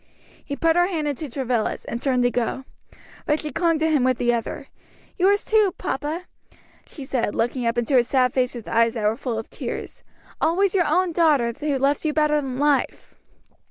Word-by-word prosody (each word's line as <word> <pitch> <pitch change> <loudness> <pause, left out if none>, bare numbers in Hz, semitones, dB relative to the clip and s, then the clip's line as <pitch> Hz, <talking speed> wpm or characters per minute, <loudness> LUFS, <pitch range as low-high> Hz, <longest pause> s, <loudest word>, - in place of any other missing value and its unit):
He 285 - -5
put 325 +2 +2
her 350 0 +4
hand 320 -5 -2
into 290 +1 -4
Travilla's, 245 -3 -2
and 235 - -5
turned 255 -3 +1
to 245 - +2
go. 245 +2 -2 0.6
But 300 +1 +2
she 305 - -5
clung 335 -2 +1
to 315 +1 +1
him 290 -5 +3
with 255 -1 +2
the 240 0 +1
other. 230 -1 -4 0.5
"Yours 400 +3 +3
too, 430 -4 +3
papa," 300 +6 -3 0.6
she 280 - -9
said, 245 -5 -1
looking 240 +1 -1
up 230 +1 0
into 240 +3 +1
his 240 -1 +3
sad 255 -2 +2
face 255 -1 0
with 235 - -8
eyes 230 0 +2
that 220 - -3
were 215 +1 +2
full 240 -2 -4
of 225 - -5
tears, - - -6 0.4
"always 375 +3 +2
your 365 -3 +2
own 365 -1 +2
daughter 300 -8 +2
who 290 -2 0
loves 275 +2 +1
you 310 -1 0
better 300 -1 +2
than 260 -2 -5
life." 290 -1 0
275 Hz, 200 wpm, -23 LUFS, 245-315 Hz, 0.6 s, her